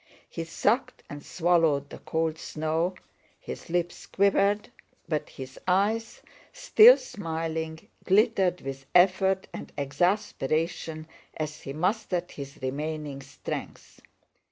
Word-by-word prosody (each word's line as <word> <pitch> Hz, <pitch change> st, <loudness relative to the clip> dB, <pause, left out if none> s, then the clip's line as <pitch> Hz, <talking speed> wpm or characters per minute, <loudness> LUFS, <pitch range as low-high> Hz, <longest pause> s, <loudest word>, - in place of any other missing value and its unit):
He 165 Hz, -, -5 dB
sucked 215 Hz, +9 st, 0 dB
and 145 Hz, 0 st, -7 dB
swallowed 165 Hz, -5 st, +2 dB
the -, -, -8 dB
cold 160 Hz, -1 st, -1 dB
snow, 160 Hz, +4 st, -1 dB, 0.4 s
his -, -, -8 dB
lips 175 Hz, 0 st, -2 dB
quivered 200 Hz, +1 st, +2 dB, 0.4 s
but 155 Hz, -3 st, -2 dB
his 130 Hz, 0 st, -9 dB
eyes, 220 Hz, -, +1 dB, 0.3 s
still -, -, +7 dB
smiling, 160 Hz, -, -4 dB, 0.2 s
glittered 195 Hz, -3 st, +3 dB
with 135 Hz, 0 st, -7 dB
effort 190 Hz, +1 st, +4 dB
and -, -, -7 dB
exasperation 160 Hz, 0 st, -1 dB, 0.3 s
as 155 Hz, -1 st, -4 dB
he 135 Hz, -, -6 dB
mustered 180 Hz, +1 st, -1 dB
his 140 Hz, -1 st, -8 dB
remaining 145 Hz, +1 st, -3 dB
strength. -, -, -7 dB
165 Hz, 105 wpm, -27 LUFS, 155-195 Hz, 0.4 s, still